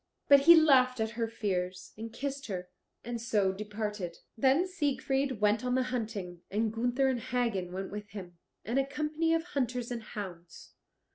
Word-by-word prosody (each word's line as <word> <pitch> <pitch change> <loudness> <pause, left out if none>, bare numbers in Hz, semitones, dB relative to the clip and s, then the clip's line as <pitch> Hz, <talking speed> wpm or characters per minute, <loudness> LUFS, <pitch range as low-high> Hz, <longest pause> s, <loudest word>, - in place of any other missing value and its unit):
But 280 -1 +9
he 335 +5 +9
laughed 260 -6 +5
at 220 0 0
her 230 0 -2
fears, 185 -5 -3
and 225 +1 -7
kissed 275 +3 -4
her, 180 -3 -5 0.3
and 235 0 -4
so 210 -5 +2
departed. 210 -3 -4 0.2
Then 270 +9 +3
Siegfried 275 - -1
went 210 +2 +3
on 250 0 +1
the 260 - +2
hunting, 200 -7 -4
and 215 +2 0
Gunther 245 +4 +1
and 260 -2 +1
Hagen 230 -7 -1
went 190 +1 -5
with 205 0 -6
him, 180 -4 -9 0.3
and 240 +5 +1
a 270 - 0
company 305 +3 -1
of 325 - 0
hunters 250 -7 -2
and 235 -1 -3
hounds. 180 -5 -9
230 Hz, 170 wpm, -31 LUFS, 205-270 Hz, 0.3 s, But